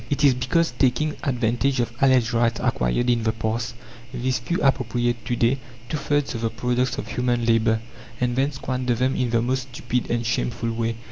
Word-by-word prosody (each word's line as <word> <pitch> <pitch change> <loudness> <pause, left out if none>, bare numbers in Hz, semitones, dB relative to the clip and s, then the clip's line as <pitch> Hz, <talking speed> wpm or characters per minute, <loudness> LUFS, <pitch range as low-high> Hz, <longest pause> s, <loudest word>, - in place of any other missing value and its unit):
It 145 +1 0
is 140 -2 +7
because, 165 +7 +1
taking 140 +4 +1
advantage 125 0 0
of 120 0 -1
alleged 130 -3 +4
rights 115 0 +2
acquired 60 - 0
in 120 -1 +3
the 110 0 +1
past, 115 +1 -3 0.4
these 130 +1 -1
few 125 +9 -2
appropriate 120 -3 +1
to 120 0 0
day 120 +3 +2 0.3
two 155 - -1
thirds 145 -1 0
of 115 - -4
the 115 - +1
products 125 +2 -1
of - - -4
human 120 -1 0
labour, 110 -1 +3 0.4
and 125 -1 0
then 135 +3 +1
squander 130 -2 -2
them 130 +3 +1
in 125 -2 0
the 115 0 +2
most 130 +1 -1
stupid 125 0 -2
and 120 0 0
shameful 115 0 -1
way. 115 0 -1
120 Hz, 195 wpm, -24 LUFS, 115-130 Hz, 0.4 s, is